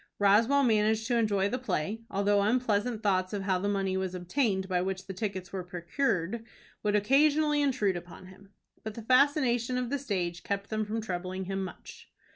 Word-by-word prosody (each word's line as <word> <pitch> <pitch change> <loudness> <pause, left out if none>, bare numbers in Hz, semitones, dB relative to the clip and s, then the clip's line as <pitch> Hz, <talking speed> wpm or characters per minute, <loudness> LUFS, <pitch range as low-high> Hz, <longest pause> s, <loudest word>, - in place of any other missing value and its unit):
Roswell 225 +8 +4
managed 220 -2 +2
to 240 - 0
enjoy 205 -4 +2
the 255 +5 -2
play, 225 -3 -2
although 200 +1 +2
unpleasant 220 0 0
thoughts 185 -1 +1
of 200 -2 -2
how 190 -2 +1
the 200 +2 -1
money 195 -2 0
was 190 -1 -2
obtained 190 +1 0
by 180 -2 0
which 190 0 -3
the 190 - -6
tickets 190 -2 -4
were 190 -2 -3
procured, 180 +3 -2 0.4
would 210 -1 +1
occasionally 295 +7 +3
intrude 235 -9 +1
upon 175 0 -9
him. 190 +1 -15 0.3
But 220 -1 -6
the 230 - -7
fascination 255 -1 +3
of 250 0 -2
the 285 - 0
stage 180 -9 -2
kept 200 +1 -4
them 215 0 0
from 220 +2 -3
troubling 185 -1 -4
him 195 +1 -2
much. 185 - -10
205 Hz, 185 wpm, -29 LUFS, 190-235 Hz, 0.4 s, Roswell